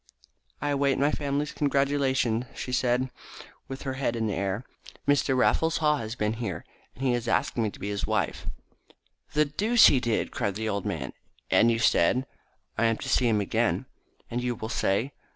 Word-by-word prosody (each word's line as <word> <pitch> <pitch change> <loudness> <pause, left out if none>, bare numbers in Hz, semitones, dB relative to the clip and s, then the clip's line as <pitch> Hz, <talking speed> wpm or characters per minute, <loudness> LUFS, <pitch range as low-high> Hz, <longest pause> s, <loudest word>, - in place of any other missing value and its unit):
"I 145 - 0
await 140 -1 +2
my 145 +2 +2
family's 145 0 -2
congratulations," 135 -4 +1
she 125 - -5
said, 125 0 +1 0.6
with 135 0 -7
her 135 - -3
head 130 -3 -1
in 115 -1 -1
the 105 - -1
air. 100 +4 -2 0.4
"Mr. 140 -2 +3
Raffles 160 +5 +2
Haw 150 -1 +2
has 115 -2 -5
been 105 -2 0
here, 95 -8 -4 0.3
and 130 - -7
he 125 - +3
has 120 -1 -2
asked - - +1
me 115 -3 +1
to - - -13
be 100 - -4
his 100 0 -2
wife." 110 -7 -1 0.9
"The 150 0 +4
deuce 215 +11 +4
he 135 - +6
did!" 120 -3 -1
cried 100 -2 -2
the 110 +1 -3
old 100 -2 -2
man. - - -4 0.4
"And 115 - +5
you 115 - +2
said 115 +3 +3 0.3
?" - - -42
"I 115 - +3
am 115 -1 +2
to - - -6
see 125 - +3
him 110 -3 +2
again." 100 - 0 0.5
"And 120 +1 -1
you 125 -1 -1
will 110 0 -6
say 115 +4 0
125 Hz, 195 wpm, -27 LUFS, 110-140 Hz, 0.9 s, he